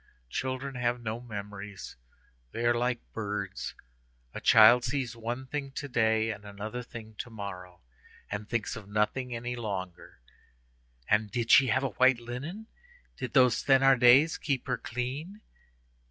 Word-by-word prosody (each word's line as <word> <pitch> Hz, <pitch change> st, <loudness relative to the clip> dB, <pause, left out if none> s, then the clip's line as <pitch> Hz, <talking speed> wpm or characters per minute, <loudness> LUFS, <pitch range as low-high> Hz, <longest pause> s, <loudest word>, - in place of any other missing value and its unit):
Children 130 Hz, +1 st, -3 dB
have 125 Hz, -1 st, -1 dB
no 115 Hz, 0 st, -4 dB
memories. 105 Hz, -3 st, -8 dB, 0.6 s
They 115 Hz, -, -2 dB
are 120 Hz, -, +5 dB
like 120 Hz, 0 st, 0 dB
birds. 100 Hz, -3 st, -4 dB, 0.6 s
A -, -, -6 dB
child 115 Hz, +3 st, +7 dB
sees 130 Hz, -4 st, -2 dB
one 120 Hz, +3 st, -4 dB
thing 140 Hz, 0 st, -4 dB
to 145 Hz, -, -5 dB
day 110 Hz, -3 st, +2 dB
and 105 Hz, -1 st, -8 dB
another 105 Hz, +4 st, -6 dB
thing 115 Hz, -2 st, -10 dB
to -, -, -5 dB
morrow, 90 Hz, -, -8 dB, 0.4 s
and 105 Hz, +1 st, -5 dB
thinks 115 Hz, -3 st, -2 dB
of 105 Hz, -3 st, -10 dB
nothing 120 Hz, +4 st, -1 dB
any 120 Hz, +1 st, -4 dB
longer. 95 Hz, -, -6 dB, 0.9 s
And 105 Hz, 0 st, +2 dB
did 120 Hz, +1 st, -1 dB
she 135 Hz, -, +7 dB
have 130 Hz, +3 st, +1 dB
white 130 Hz, -1 st, +3 dB
linen? 140 Hz, -, -6 dB, 0.5 s
Did 125 Hz, -2 st, -6 dB
those 125 Hz, -3 st, +4 dB
Thénardiers 135 Hz, +2 st, +5 dB
keep 135 Hz, -4 st, -1 dB
her 125 Hz, -, -2 dB
clean? 140 Hz, -, -5 dB
120 Hz, 140 wpm, -29 LUFS, 105-130 Hz, 0.9 s, child